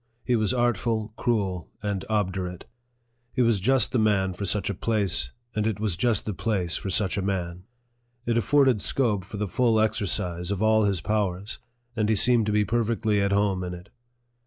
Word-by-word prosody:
He 125 - +1
was 110 -2 +1
artful, 115 -3 0
cruel, 100 -8 -1
and 100 -2 -2
obdurate. 95 -4 -2 0.7
He 125 - +2
was 115 -3 +2
just 130 +4 +2
the 125 - +1
man 100 -3 +2
for 100 +3 -5
such 100 +1 0
a 100 - -1
place, 100 -1 +1 0.3
and 105 0 0
it 110 -4 -2
was 105 -5 -1
just 115 +3 0
the 105 - -2
place 95 -5 -1
for 95 - -3
such 100 -1 0
a - - -1
man. 90 -2 -3 0.6
It 115 - 0
afforded 130 -1 +3
scope 110 -8 0
for 105 +3 -8
the 105 0 -2
full 115 +2 +2
exercise 95 -5 -1
of 100 -2 -1
all 110 0 +4
his 100 -4 0
powers, 100 0 -2 0.4
and 110 -2 0
he 110 - +3
seemed 115 +1 +3
to - - +1
be 105 0 +2
perfectly 110 -2 0
at 100 0 +1
home 100 -2 +1
in 90 0 -4
it. 90 0 -13
105 Hz, 190 wpm, -26 LUFS, 95-110 Hz, 0.7 s, all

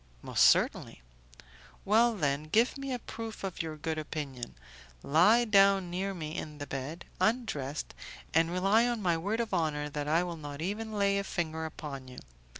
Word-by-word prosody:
"Most - - +4
certainly." - - +1 0.8
"Well, 225 +3 +4
then, 145 -4 0
give 225 +10 +2
me 275 -1 -5
a 250 - -1
proof 225 -2 -7
of 190 -2 -3
your 160 -2 -5
good 155 +1 -3
opinion; 140 -6 -5 0.5
lie 205 +11 +5
down 195 -4 +4
near 190 +2 -2
me 155 -2 -5
in 150 -1 -5
the 145 - -5
bed, 140 +5 -5
undressed, 185 - -1 0.4
and 165 +1 +4
rely 195 +6 +3
on 235 -3 -2
my 175 -2 +3
word 200 +8 -2
of 230 -4 -2
honour 150 -4 0
that 145 0 -4
I 165 +3 +3
will 175 -2 -5
not 145 -2 -7
even 210 +6 -3
lay 200 -1 +2
a - - -2
finger 160 -4 -3
upon 140 -4 -7
you. 125 0 -11
170 Hz, 175 wpm, -30 LUFS, 150-205 Hz, 0.8 s, lie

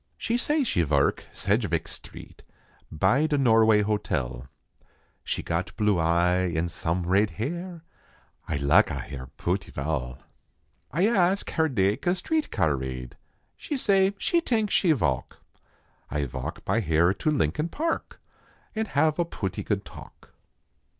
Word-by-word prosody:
She 230 - -1
say 295 +4 +1
she 90 - +1
verk 70 -2 +1
Saidgeveck - - 0
street - - -10 0.5
By 100 - +2
da 150 -2 +1
Norway 110 -5 +5
hotel; 65 - -2 0.8
She - - -3
got 85 +2 -3
blue 105 -4 +2
eye 90 +2 +2
en 85 +2 0
some 85 +1 -2
rade 100 +4 +3
hair 170 - -4 0.6
Ay - - -1
laka 70 +1 +3
hare 65 -2 -7
pooty 95 +3 -2
val. 70 -3 -3 0.7
A} 170 +9 +2
ask 195 -3 +2
hare 160 -1 +1
dake 105 - 0
a 175 - +3
street 310 - -1
car 80 -8 +1
rade. 65 -2 -6 0.4
She 290 - -4
say 195 -4 +3
she 340 +9 +1
tank 220 - 0
she 175 - +3
voke; 65 - 0 0.7
Ay 75 -1 -1
voke 65 - -6
by 115 - +1
hare 85 -2 +3
to 155 - -1
Lincoln 150 - 0
Park 325 - -3 0.6
En 220 0 -1
have 155 +1 +1
a - - +4
pooty 95 - -4
good - - -2
talk. - - -13
105 Hz, 145 wpm, -26 LUFS, -, 0.8 s, Norway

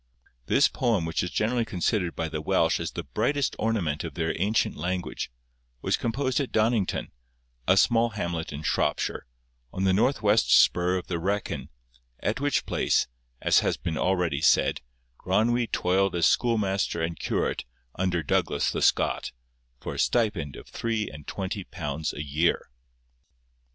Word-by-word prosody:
This - - +5
poem, 115 -9 0
which 80 - -1
is 90 - -2
generally 115 +5 0
considered 90 -3 -1
by 80 - -2
the 75 -1 -4
Welsh 85 -1 +2
as 85 - -4
the 85 - -4
brightest 120 - 0
ornament 90 -10 0
of 85 -3 -6
their 80 -1 -1
ancient 105 +3 +1
language, 90 0 -3 0.5
was - - +2
composed 130 +3 -1
at 140 - -2
Donnington, 110 -3 +1 0.6
a 95 - +5
small 115 +2 +4
hamlet 85 -6 -3
in 75 +1 -6
Shropshire, 75 - 0 0.4
on 95 - -3
the 95 -1 +3
north 125 +6 +2
west 105 +2 +3
spur 90 +1 +3
of 90 - -5
the 85 -2 -3
Wrekin, 100 +4 -2 0.5
at 105 - -1
which 145 -1 +1
place, - - +1 0.4
as - - +5
has - - 0
been 80 - -3
already 90 -4 0
said, - - +3 0.4
Gronwy 115 +6 +1
toiled 95 +1 +1
as 85 - +3
schoolmaster 100 -7 +1
and 80 -1 -3
curate - - -1 0.3
under 90 -3 -1
Douglas - - +1
the - - -3
Scot, - - +2 0.5
for - - -5
a - - -6
stipend 105 - +1
of - - -11
three 115 -2 -2
and 75 -2 -11
twenty 95 +1 -4
pounds 75 -2 -4
a 75 - -5
year. 75 +2 0
95 Hz, 155 wpm, -27 LUFS, 85-110 Hz, 0.6 s, This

